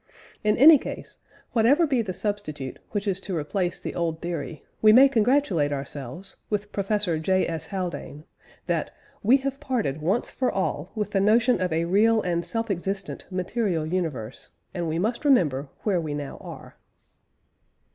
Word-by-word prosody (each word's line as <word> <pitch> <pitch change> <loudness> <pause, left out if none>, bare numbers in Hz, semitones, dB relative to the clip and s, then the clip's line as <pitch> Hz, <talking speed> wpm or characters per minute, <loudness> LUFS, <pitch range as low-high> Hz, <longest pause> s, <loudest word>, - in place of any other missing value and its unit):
In 210 0 +2
any 300 +3 +9
case, - - -7 0.3
whatever 255 +9 +4
be 265 -6 +1
the 205 -4 -4
substitute 180 -9 -4
which 205 -1 -3
is 195 -1 0
to 195 -3 -4
replace 175 +4 -2
the - - -5
old 165 -2 -2
theory, 170 -2 -5 0.2
we 215 - +7
may 260 +5 +8
congratulate 225 - +2
ourselves, 140 +5 -6
with 210 -1 -2
Professor 200 -4 0
J. 185 +4 +1
S. 160 -1 -4
Haldane, 175 -6 -5 0.4
that - - -2 0.3
"we 240 +6 +5
have 275 0 -2
parted 230 - -2
once 195 +10 0
for 255 - 0
all 185 -3 -2
with 210 -2 -2
the 195 - +2
notion 225 +1 +3
of 180 -1 0
a 165 +1 +1
real 215 +5 +4
and 170 -1 0
self 225 +2 -2
existent 195 +1 -4
Material 185 -2 -1
universe; 155 -9 -4 0.2
and 175 -2 -2
we 160 +1 -1
must 220 - -1
remember 150 - +2
where 190 -5 +1
we 150 -2 -4
now 145 -1 -6
are." - - -11
190 Hz, 165 wpm, -25 LUFS, 165-220 Hz, 0.4 s, any